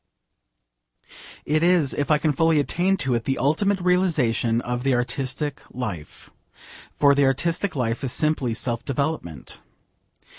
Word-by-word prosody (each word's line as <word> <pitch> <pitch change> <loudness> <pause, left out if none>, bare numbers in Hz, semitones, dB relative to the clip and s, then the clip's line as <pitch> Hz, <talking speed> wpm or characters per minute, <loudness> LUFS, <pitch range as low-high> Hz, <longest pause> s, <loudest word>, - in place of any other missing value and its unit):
It 155 +1 +1
is, 170 -5 +3
if 145 - -2
I 150 - +5
can 150 0 0
fully 160 +2 +3
attain 180 +6 +1
to 130 - +1
it, 115 -1 -1
the 135 - -1
ultimate 190 +10 +1
realisation 160 -11 +1
of 125 0 -3
the 135 0 +1
artistic 130 +4 -2
life. 105 -12 -7 0.7
For 140 -1 +5
the 140 0 +3
artistic 170 +8 0
life 125 0 -2
is 130 - -1
simply 140 -7 0
self 120 -1 -2
development. 140 - -4
140 Hz, 140 wpm, -23 LUFS, 125-160 Hz, 0.7 s, I